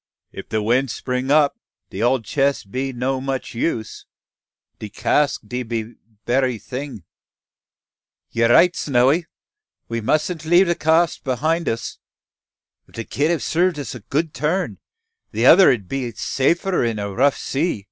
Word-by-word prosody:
If - - -10
de 110 -1 -1
wind 125 +3 0
'pring 125 +1 -2
up, 145 -1 +3 0.3
de 95 - -5
ole 125 +2 +2
chess 140 +4 0
be 130 +7 -4
no 130 +2 -2 0.3
use 115 -3 -3
much. - - -61
De 110 - -7
cask 145 +7 +1
de 125 +4 -4 0.6
berry 125 0 +1
ting 130 +6 -6
den." 100 - -13 1.3
"You're 115 0 +2
right, 175 +9 +5
Snowy! 140 +5 +2 0.6
we 115 0 -2
musn't 155 +7 0
leave 175 +4 +5
the 170 - +1
cask 165 +1 +1
behind 155 +5 0
us. 115 +1 -4 0.9
If - - -19
the 115 - -4
kit 145 +7 -1
have 170 -2 0
served 175 0 +1
us 145 - -5
a 125 - -8
good 150 +9 -2
turn, 155 +7 -2 0.5
the - - 0
other 195 - +8
'ud 105 -7 -2
be 130 +2 -3
safer 170 - 0
in 115 -2 -1
a 100 -1 -4
rough 135 +6 +2
sea. 150 -2 -2
135 Hz, 155 wpm, -21 LUFS, 120-160 Hz, 1.3 s, other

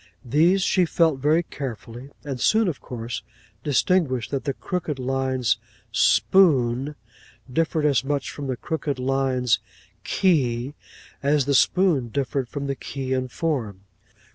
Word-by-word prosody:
These 170 +9 +3
she 185 -1 +3
felt 160 -4 +2
very 155 +5 +3
carefully, 125 -3 -7
and 135 -4 -5
soon, 220 -1 +3
of 160 -6 -3
course, 120 -1 -5 0.4
distinguished 145 -4 +1
that 140 -1 -2
the 140 - 0
crooked 165 -5 -3
lines 130 -3 0 0.3
spoon, 140 -6 +3 0.6
differed 160 0 +1
as 140 -2 +3
much 140 0 -2
from 145 -1 -6
the 130 -2 -2
crooked 155 -3 -3
lines 130 -2 +1 0.4
key, 135 -8 +1 0.5
as 140 -1 +2
the 140 - +1
spoon 160 -3 +3
differed 135 0 -2
from 140 -1 -4
the 140 - -1
key 135 -1 -4
in 130 0 -1
form. 125 - -3
140 Hz, 135 wpm, -24 LUFS, 130-155 Hz, 0.6 s, These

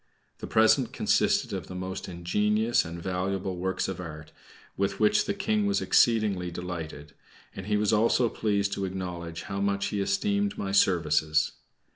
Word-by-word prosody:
The - - -6
present 110 +3 +3
consisted - - +1
of - - -4
the 90 - -8
most 95 +1 -5
ingenious 105 +6 +1
and 85 +1 -7
valuable 95 +1 -2
works 95 +1 -1
of 95 -2 -5
art, 75 -3 -8 0.4
with 100 0 -1
which 105 -1 +3
the 205 - -2
King 210 +1 0
was 200 - +1
exceedingly 105 -6 +2
delighted, 80 -4 -7 0.4
and 95 0 -7
he 105 0 +2
was 105 +1 +1
also 115 +3 +3
pleased 100 -3 -1
to 100 - -2
acknowledge 90 -3 -5
how 100 -1 -4
much 100 0 0
he 105 - -2
esteemed 205 - 0
my 95 - -3
services. 80 -5 +2
95 Hz, 160 wpm, -27 LUFS, 90-110 Hz, 0.4 s, present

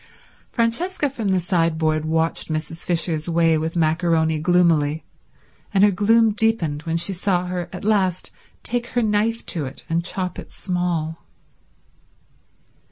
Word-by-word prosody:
Francesca 285 +7 0
from 230 -6 -4
the 190 -1 +2
sideboard 160 -3 0
watched 160 +1 0
Mrs. 155 +1 -4
Fisher's 165 -2 0
way 165 -1 +3
with 160 +2 -2
macaroni 160 -1 +1
gloomily, 160 -3 +2 0.7
and 200 -2 +3
her 205 - +6
gloom 220 +3 +3
deepened 205 -9 0
when 165 0 0
she 185 +4 +1
saw 180 -1 0
her 180 -1 -4
at 180 - -8
last 195 -4 0 0.3
take 240 0 -2
her 245 -1 0
knife 220 +2 0
to 160 -5 -2
it 135 +2 -9
and 165 +1 0
chop 185 +1 -2
it - - -10
small. 175 -3 -2
175 Hz, 140 wpm, -22 LUFS, 160-205 Hz, 0.7 s, her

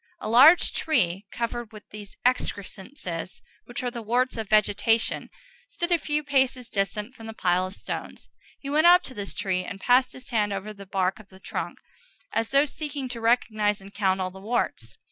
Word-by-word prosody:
A - - -5
large 275 +10 +7
tree, 195 - 0
covered 235 -1 -3
with 215 -1 -13
those 205 -1 -10
excrescences 200 - -2 0.3
which 250 +2 -6
are 245 - -1
the 240 -1 -6
warts 245 +4 +1
of 220 -3 -5
vegetation, 215 +2 +2 0.4
stood 345 -7 -4
a 345 - +4
few 300 0 -1
paces 265 -3 +1
distant 210 +4 -1
from 225 -3 -11
the 225 - -7
pile 180 -1 +1
of 190 - -8
stones. - - -6 0.3
He 275 - -10
went 305 +4 +4
up 355 +1 +7
to 260 - -8
this 205 -4 -6
tree 185 -2 -1
and 195 +2 -7
passed 250 +4 +3
his 255 0 -11
hand 210 -3 +1
over 200 +2 -5
the 200 -1 -12
bark 190 +1 0
of 215 - -15
the 190 - -16
trunk, - - -5 0.6
as 225 0 0
though 275 +3 +4
seeking 290 -2 -4
to 235 -2 -5
recognize 215 -3 +2
and 195 +1 -13
count 190 -2 +1
all 185 -1 -2
the 190 +1 -12
warts. 125 - -2
225 Hz, 195 wpm, -26 LUFS, 195-255 Hz, 0.6 s, large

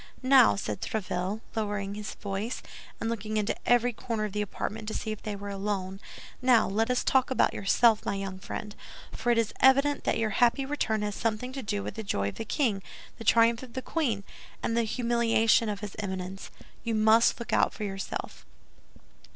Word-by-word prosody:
"Now," 255 - +6
said 105 +1 -4
Tréville, 195 0 -2
lowering 205 -2 -2
his 210 0 -6
voice, 205 +4 -4 0.4
and - - -2
looking 215 -1 -2
into 210 0 0
every 245 0 +4
corner 220 -1 -3
of 210 - -4
the 210 - -1
apartment 215 +2 -4
to 220 - -3
see 220 - -3
if 215 - -6
they 210 -1 -4
were 200 0 -6
alone, 195 -1 -3 0.4
"now 250 -3 +5
let 220 +4 0
us 250 -1 +1
talk 260 -1 +3
about 260 - +2
yourself, 220 +2 +3
my - - -1
young 195 -1 -5
friend; 210 +2 -6 0.4
for 240 - 0
it 235 - +3
is 230 -2 +1
evident 275 +2 +4
that - - +1
your 220 -1 0
happy 245 +5 +3
return 235 -7 -1
has 210 0 -2
something 225 +4 -2
to 270 - -4
do 205 -2 -2
with - - -5
the 220 - -5
joy 100 - -1
of - - -10
the 225 - -4
king, 220 -4 0 0.4
the - - -6
triumph 230 +1 +4
of 255 -3 -11
the 260 - -3
queen, 240 -12 -1 0.4
and 230 - 0
the 235 -1 +2
humiliation 230 -1 +2
of 205 -1 -4
his 210 -2 -6
Eminence. 190 -1 -5 0.3
You 230 -1 -1
must 220 +3 +4
look 235 - -5
out - - +4
for 215 - -7
yourself." 195 -1 -5
220 Hz, 200 wpm, -28 LUFS, 200-235 Hz, 0.4 s, Now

